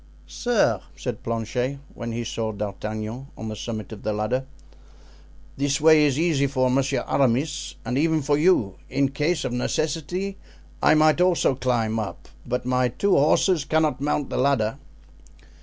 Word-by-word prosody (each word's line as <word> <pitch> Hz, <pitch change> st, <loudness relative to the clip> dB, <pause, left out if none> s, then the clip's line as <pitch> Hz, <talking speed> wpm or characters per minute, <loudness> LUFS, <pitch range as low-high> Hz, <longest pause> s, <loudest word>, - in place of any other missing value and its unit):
"Sir," 210 Hz, -, +1 dB
said -, -, -5 dB
Planchet 120 Hz, +4 st, -2 dB, 0.2 s
when 115 Hz, 0 st, -5 dB
he 120 Hz, +1 st, -3 dB
saw 115 Hz, -1 st, -3 dB
D'Artagnan 110 Hz, +4 st, -5 dB
on 110 Hz, -, -5 dB
the 110 Hz, -, -5 dB
summit 110 Hz, -2 st, -6 dB
of 110 Hz, -, -8 dB
the 110 Hz, -, -1 dB
ladder, 110 Hz, +5 st, -1 dB, 1.1 s
"this 140 Hz, +1 st, +1 dB
way 155 Hz, 0 st, +6 dB
is 140 Hz, -2 st, +1 dB
easy 155 Hz, -4 st, +2 dB
for 130 Hz, -2 st, +1 dB
Monsieur 135 Hz, +1 st, 0 dB
Aramis 135 Hz, +3 st, 0 dB
and 125 Hz, +4 st, -1 dB
even 160 Hz, -1 st, +2 dB
for 145 Hz, +1 st, +2 dB
you; 145 Hz, -, +2 dB
in 135 Hz, 0 st, +1 dB
case 150 Hz, +5 st, -1 dB
of 125 Hz, -, -2 dB
necessity 165 Hz, +9 st, -2 dB, 0.4 s
I 150 Hz, -, +5 dB
might 155 Hz, +2 st, +4 dB
also 180 Hz, -6 st, +3 dB
climb 120 Hz, -4 st, 0 dB
up, 105 Hz, -, -6 dB, 0.2 s
but 125 Hz, 0 st, -2 dB
my 125 Hz, 0 st, +2 dB
two 200 Hz, -, -1 dB
horses 155 Hz, +3 st, +3 dB
cannot 155 Hz, -2 st, +1 dB
mount 145 Hz, -1 st, -1 dB
the -, -, -2 dB
ladder." 130 Hz, -2 st, +1 dB
135 Hz, 155 wpm, -24 LUFS, 115-150 Hz, 1.1 s, way